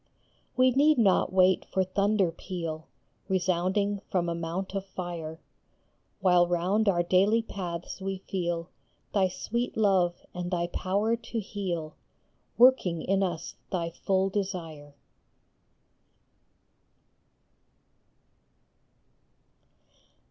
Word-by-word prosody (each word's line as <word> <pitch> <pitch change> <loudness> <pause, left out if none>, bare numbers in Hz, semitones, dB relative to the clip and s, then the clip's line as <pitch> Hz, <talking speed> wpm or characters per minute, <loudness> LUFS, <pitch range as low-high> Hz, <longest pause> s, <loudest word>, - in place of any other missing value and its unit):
We 255 0 +5
need 295 +4 +4
not 195 -5 +3
wait 185 0 +4
for 190 - +2
thunder 200 0 +1
peal 165 -2 -6 0.4
Resounding 190 +2 +1
from 175 -2 0
a - - -1
mount 170 +3 -4
of 195 -1 -2
fire, 170 -4 -6 0.8
While 180 -2 +5
round 185 +5 +1
our 175 -3 +2
daily 200 +6 +3
paths 180 -4 -6
we 195 0 -3
feel 175 -3 -3 0.4
Thy 195 -2 +3
sweet 235 +7 -3
love 190 -5 +2
and 180 0 -4
thy 175 -2 0
power 200 +6 0
to 230 0 -5
heal, 180 -7 -4 0.6
Working 230 -10 +5
in 195 0 +1
us 175 -4 -2 0.2
thy 170 -3 -1
full 190 +2 0
desire. 165 -8 -4
185 Hz, 100 wpm, -28 LUFS, 175-200 Hz, 0.8 s, We